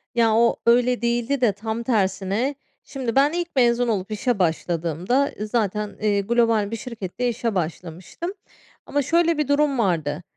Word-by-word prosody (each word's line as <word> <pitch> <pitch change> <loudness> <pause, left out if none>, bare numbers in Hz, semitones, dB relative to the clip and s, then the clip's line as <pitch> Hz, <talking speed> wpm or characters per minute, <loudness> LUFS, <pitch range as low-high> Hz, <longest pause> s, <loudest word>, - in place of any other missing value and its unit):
Ya, 230 -2 +3
o 235 +1 +4
öyle 245 0 +3
değildi 240 +3 0
de 235 - +4
tam 220 +3 -4
tersine, 205 +3 0 0.3
şimdi 255 -5 -4
ben 280 +2 +4
ilk 345 0 -1
mezun 240 -1 +3
olup 210 -2 -2
işe 215 +1 -1
başladığımda, 175 - 0
zaten, 210 -1 -2
eee, 205 -1 +2
global 225 -1 +1
bir - - -2
şirkette 230 0 -4
işe 230 -2 -2
başlamıştım. 180 - -4 0.5
Ama 290 - 0
şöyle 335 +3 +2
bir 300 -3 0
durum 285 -2 +2
vardı, 165 -6 0
230 Hz, 150 wpm, -23 LUFS, 200-250 Hz, 0.5 s, o